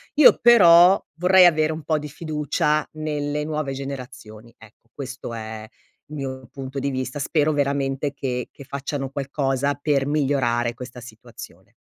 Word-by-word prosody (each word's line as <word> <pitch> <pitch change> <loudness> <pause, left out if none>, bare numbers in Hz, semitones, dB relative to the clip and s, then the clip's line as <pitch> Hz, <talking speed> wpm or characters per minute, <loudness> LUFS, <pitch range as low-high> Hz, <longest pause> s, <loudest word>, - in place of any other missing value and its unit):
io 300 -2 +7
però 185 -5 +7 0.2
vorrei 185 0 +6
avere 155 -2 +3
un 155 -1 -6
po' 155 0 0
di 150 0 -7
fiducia 150 0 -1
nelle 150 -1 -3
nuove 150 -3 -3
generazioni. 125 -5 -9
Ecco, 110 +1 -20
questo 130 -3 -7
è 110 -1 -7 0.4
il 150 - -9
mio 130 -3 -6
punto 135 0 -6
di 140 +1 -2
vista. 130 +1 -4
Spero 155 +1 +1
veramente 140 0 -1
che 125 -3 -4
che 140 - -13
facciano 140 0 -5
qualcosa 140 0 -1
per 145 -2 0
migliorare 130 -5 0
questa 125 +1 -10
situazione. 115 -2 -13
140 Hz, 145 wpm, -22 LUFS, 130-150 Hz, 0.4 s, io